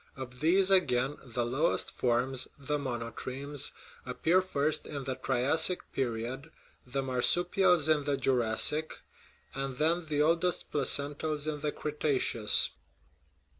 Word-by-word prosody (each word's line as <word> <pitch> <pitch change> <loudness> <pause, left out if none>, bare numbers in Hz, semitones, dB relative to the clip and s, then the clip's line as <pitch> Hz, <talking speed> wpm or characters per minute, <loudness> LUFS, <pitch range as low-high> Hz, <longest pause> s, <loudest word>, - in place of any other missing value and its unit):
Of 125 -2 -8
these, 185 +5 +3
again, 140 -7 +2
the 120 -1 -2
lowest 135 +7 0
forms, 125 +1 0
the 145 +1 -2
monotremes, 130 +3 -3 0.3
appear 160 +8 +2
first 155 -4 -1
in 140 -2 -5
the 130 0 -2
Triassic 140 +8 0
period, 125 +1 -3 0.4
the 135 +2 -2
marsupials 175 +6 +2
in 150 -2 +3
the 145 -1 0
Jurassic, 130 +6 +1 0.5
and 135 -1 -4
then 165 +3 +1
the 150 -1 -1
oldest 170 +3 +1
placentals 145 +1 0
in 150 -1 -2
the 150 0 -1
Cretaceous. 145 -8 0
140 Hz, 120 wpm, -30 LUFS, 130-155 Hz, 0.5 s, these